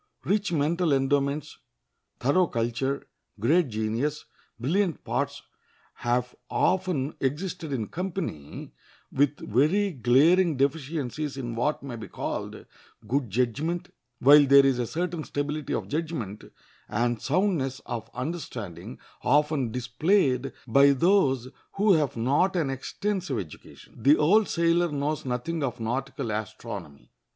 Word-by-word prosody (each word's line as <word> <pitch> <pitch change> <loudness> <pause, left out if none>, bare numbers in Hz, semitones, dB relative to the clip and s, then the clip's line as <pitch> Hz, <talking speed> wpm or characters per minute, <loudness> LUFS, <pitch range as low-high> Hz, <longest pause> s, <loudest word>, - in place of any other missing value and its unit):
Rich 205 -1 0
mental 165 +1 +1
endowments, 140 +1 0 0.6
thorough 170 +8 +3
culture, 120 +4 -2 0.3
great 155 - +3
genius, 115 +7 -2 0.3
brilliant 170 - 0
parts - - -2 0.5
have 125 +1 -1 0.2
often 180 -7 +1
existed 160 +3 -3
in 120 -5 -1
company 165 - -5 0.4
with 145 +1 +2
very 165 - +2
glaring 150 +6 +4
deficiencies 145 0 -2
in 120 -3 -4
what 140 +7 -1
may 135 -4 -6
be 110 -2 -8
called - - -5 0.4
good 130 0 0
judgment; 145 - -1 0.2
while 145 +3 +7
there 140 0 +7
is 135 -2 +2
a 120 - -1
certain 170 +1 -3
stability 145 +1 -3
of - - -3
judgment 150 - -4 0.4
and 120 +1 0
soundness 150 -5 0
of 115 -1 -5
understanding 125 - -5 0.2
often 145 -2 +2
displayed 130 - +1 0.2
by 140 +4 +6
those 135 - +3 0.3
who 205 0 +4
have 150 -7 +1
not 145 +11 +2
an 155 -6 0
extensive 180 - -3
education. 90 +5 -10
The 140 +6 +6
old 200 +8 +4
sailor 170 0 +2
knows 145 +1 -2
nothing 130 +6 -2
of 125 -4 -2
nautical 125 +1 -3
astronomy. 105 -8 -6
140 Hz, 120 wpm, -27 LUFS, 125-165 Hz, 0.6 s, while